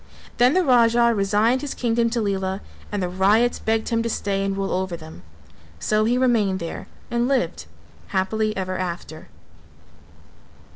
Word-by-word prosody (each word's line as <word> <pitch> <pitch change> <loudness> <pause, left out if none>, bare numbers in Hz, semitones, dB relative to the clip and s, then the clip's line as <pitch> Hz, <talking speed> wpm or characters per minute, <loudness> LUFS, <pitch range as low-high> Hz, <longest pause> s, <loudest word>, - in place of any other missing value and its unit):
Then 250 +5 +4
the 370 - +4
Raja 235 -3 +4
resigned 215 +5 +2
his 290 -2 -5
kingdom 230 -1 +1
to 235 0 -1
Lela 195 -1 -2 0.3
and 205 -2 -2
the - - 0
ryots 205 +7 +2
begged 220 0 -1
him 230 -1 +1
to 230 - -2
stay 195 -3 -1
and 195 0 -2
rule 195 0 -2
over 185 -2 -2
them; 160 - -12 0.6
so 215 - +1
he 240 +2 +2
remained 225 -7 +2
there 170 - -6 0.2
and 240 +1 +1
lived 270 -2 -1 0.4
happily 215 +2 -1
ever 185 -1 -3
after. 170 -3 -5
215 Hz, 155 wpm, -23 LUFS, 190-235 Hz, 0.6 s, Then